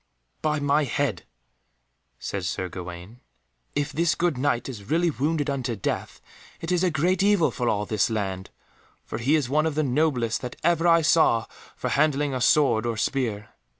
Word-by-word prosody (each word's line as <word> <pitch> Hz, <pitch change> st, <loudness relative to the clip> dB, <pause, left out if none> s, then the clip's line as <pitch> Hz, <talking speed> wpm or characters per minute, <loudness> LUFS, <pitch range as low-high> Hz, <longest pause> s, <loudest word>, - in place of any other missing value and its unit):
"By 155 Hz, -1 st, 0 dB
my 145 Hz, +1 st, +2 dB
head," 135 Hz, -7 st, -2 dB, 0.9 s
said 100 Hz, -2 st, -4 dB
Sir 90 Hz, 0 st, -3 dB
Gawaine, 90 Hz, +5 st, -9 dB, 0.6 s
"if 145 Hz, 0 st, -1 dB
this 165 Hz, +3 st, +1 dB
good 170 Hz, -3 st, 0 dB
Knight 125 Hz, -2 st, 0 dB
is 110 Hz, -6 st, -8 dB
really 170 Hz, +1 st, +2 dB
wounded 150 Hz, +2 st, -1 dB
unto 130 Hz, -4 st, -2 dB
death, 95 Hz, -, -4 dB, 0.4 s
it 165 Hz, -, -4 dB
is 180 Hz, 0 st, +2 dB
a 185 Hz, -, +3 dB
great 175 Hz, +4 st, +1 dB
evil 200 Hz, -4 st, +3 dB
for 120 Hz, -3 st, -1 dB
all 105 Hz, 0 st, 0 dB
this 110 Hz, +3 st, +1 dB
land, 95 Hz, -4 st, -3 dB, 0.6 s
for 110 Hz, -, -5 dB
he 135 Hz, +7 st, +2 dB
is 150 Hz, -5 st, +1 dB
one 155 Hz, +4 st, +2 dB
of 155 Hz, -, -3 dB
the 155 Hz, -, +1 dB
noblest 130 Hz, -5 st, 0 dB
that 125 Hz, -1 st, -6 dB
ever 170 Hz, 0 st, +2 dB
I 165 Hz, -1 st, +5 dB
saw 155 Hz, -7 st, +4 dB, 0.3 s
for -, -, -3 dB
handling 145 Hz, -1 st, +2 dB
a 130 Hz, -, -2 dB
sword 120 Hz, -5 st, +3 dB
or 115 Hz, -1 st, -2 dB
spear. 110 Hz, -4 st, -2 dB
140 Hz, 180 wpm, -25 LUFS, 115-155 Hz, 0.9 s, I